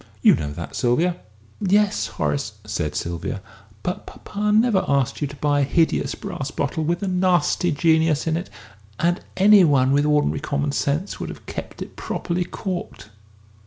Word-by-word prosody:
You - - +8
know 75 -3 -2
that, 85 +3 -7
Sylvia." 165 +9 +1 0.4
"Yes, 205 +1 +2
Horace," 135 -6 -2
said 85 -8 -3
Sylvia; 85 +2 -3 0.4
"but 180 - -3
papa 210 +1 -3
never 215 -2 +4
asked 140 -1 +1
you 145 - +1
to 140 - -10
buy 145 0 +1
a - - +3
hideous 160 +4 +1
brass 135 0 -5
bottle 145 +2 -2
with 170 +4 -1
a - - -1
nasty 180 -2 +2
Genius 160 0 +2
in 160 -1 +1
it. 175 +3 -4 0.5
And 175 +1 +2 0.2
any 200 +1 +7
one 135 -5 +4
with 145 +2 +3
ordinary 150 -1 +2
common 145 -1 -1
sense 150 +8 -1
would - - -4
have - - -10
kept - - -6
it - - -14
properly 180 +1 -2
corked!" 180 - -5
160 Hz, 165 wpm, -22 LUFS, 140-180 Hz, 0.5 s, You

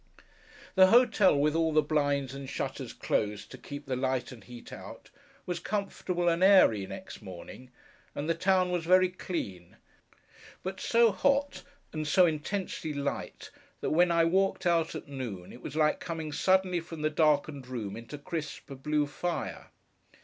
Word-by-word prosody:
The 190 -1 +7
hotel, 220 - +5
with 150 +1 +2
all 165 0 +2
the 155 0 +4
blinds 145 -3 0
and 135 -1 -7
shutters - - -4
closed 105 -1 -2
to - - -8
keep 145 0 -8
the 130 -2 -2
light 130 0 -1
and 115 -5 -12
heat 120 +4 -11
out, - - -11 0.3
was 175 -1 -3
comfortable 190 -3 -2
and 170 +1 +2
airy 150 - +6
next 190 - -9
morning, 100 +6 -10 0.5
and 145 - -3
the 165 - +3
town 185 +1 +2
was 175 -2 -1
very 185 +2 +5
clean; 100 - -6 0.9
but 190 +1 -5
so 230 -1 +4
hot, 280 +8 +1 0.3
and 155 -1 -3
so 180 +5 +5
intensely 160 0 -2
light, 140 0 -4 0.3
that - - -1
when 175 +3 +4
I 170 -1 +3
walked 190 +2 +1
out 170 -2 +2
at - - -7
noon 120 -10 -6
it 125 - -12
was - - -7
like 155 -1 +2
coming 160 -3 -5
suddenly 185 +2 +2
from 165 -2 -8
the 155 - +1
darkened 150 -3 +1
room 115 -6 -5
into 115 +5 -8
crisp 150 -1 -6
blue 150 +1 +1
fire. 170 +4 -4
155 Hz, 165 wpm, -29 LUFS, 140-180 Hz, 0.9 s, The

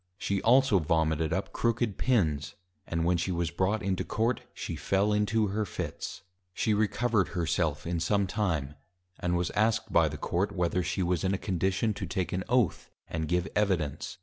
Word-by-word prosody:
_ - - -45
She 100 -2 -1
also 125 -3 +5
Vomited 80 -1 +1
up 95 +4 -2
Crooked 115 -3 0
Pins; 85 - +1 0.3
and 80 0 -1
when 90 0 +3
she 90 +2 -1
was 85 -1 -1
brought 100 +4 0
into 95 -2 0
Court, 115 +3 0
she - - -5
fell 100 +2 +1
into 105 0 +2
her 105 +2 -1
Fits. 105 - -5 0.3
She 110 - +1
Recovered 110 -1 +1
her 85 - +1
self 75 -2 0
in 85 0 -1
some 100 +4 +2
Time, 85 -8 -1 0.5
and 90 0 0
was 90 0 -1
asked 110 +1 +1
by 85 -2 +5
the 75 - -6
Court, 90 +7 -1
whether 90 0 0
she 90 +2 -1
was 90 -2 0
in 95 +1 +1
a - - -2
Condition 95 +3 0
to - - -5
take 95 -3 -2
an 95 +1 -1
Oath, 120 -7 +1 0.2
and 80 -1 -3
give 90 0 0
Evidence. 95 -9 0
95 Hz, 190 wpm, -29 LUFS, 85-105 Hz, 0.5 s, also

